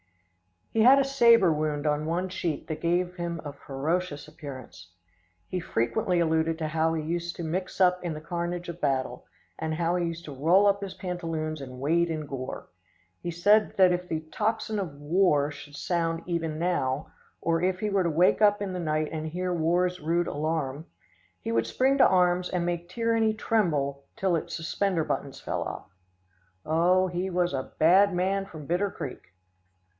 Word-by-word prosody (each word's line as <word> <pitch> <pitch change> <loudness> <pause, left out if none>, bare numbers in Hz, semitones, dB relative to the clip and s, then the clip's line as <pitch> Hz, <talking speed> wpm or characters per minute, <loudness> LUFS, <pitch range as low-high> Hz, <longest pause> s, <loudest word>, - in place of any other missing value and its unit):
He 225 - 0
had 255 +5 +8
a - - +4
sabre 235 -9 +5
wound 150 -1 -2
on 150 0 +1
one 175 +3 -1
cheek 170 -4 -3
that 155 - -5
gave 175 +2 0
him 170 -1 -3
a 145 - -5
ferocious 145 +3 -3
appearance. 130 - -10 0.5
He 185 - -2
frequently 120 +6 0
alluded 160 -1 +1
to 155 -1 -3
how 160 +1 +1
he 155 - -2
used 170 +2 -3
to 170 - -6
mix 180 +5 -3
up 180 -1 +3
in 170 -2 -2
the 155 - -7
carnage 175 +1 -3
of 170 0 -7
battle, 135 -3 -1 0.3
and 160 0 -2
how 170 +2 +1
he 175 -1 0
used 165 0 -6
to 145 - -7
roll 170 +9 +4
up 200 0 +3
his 195 -2 -6
pantaloons 165 -4 -4
and 130 -2 -8
wade 170 +5 +2
in 155 -2 -3
gore. 135 -2 -6 0.5
He - - -4
said 205 +6 +3
that 185 -2 +6
if 180 0 -2
the 160 -2 -2
tocsin 220 0 -1
of 170 -7 -4
war 150 -2 +2
should 145 -1 -11
sound 165 0 -1
even 165 -3 -2
now, 155 -5 -1 0.3
or 165 -1 +1
if 185 0 0
he 215 - 0
were 195 -1 +2
to 170 - +1
wake 175 +6 +3
up 205 -1 +5
in 200 -2 -3
the 180 - -3
night 155 -2 -1
and 160 0 -4
hear 180 +3 -2
war's 175 +2 +1
rude 170 +3 +1
alarum, 155 -1 -2 0.5
he - - -3
would 115 0 +1
spring 270 +2 +2
to - - +8
arms 180 -1 +2
and 180 -2 -1
make 175 0 -3
tyranny 225 +1 +1
tremble 145 -12 0
till 190 -3 +1
its - - -5
suspender 170 +1 0
buttons 140 -2 -3
fell - - -3
off. - - -6 0.7
Oh, 175 +4 +3
he 180 +1 -2
was 175 -2 0
a 130 -1 -4
bad 185 +4 +5
man 195 +2 0
from 155 -5 -10
Bitter 180 +6 0
Creek. 135 - -7
170 Hz, 185 wpm, -27 LUFS, 155-180 Hz, 0.7 s, had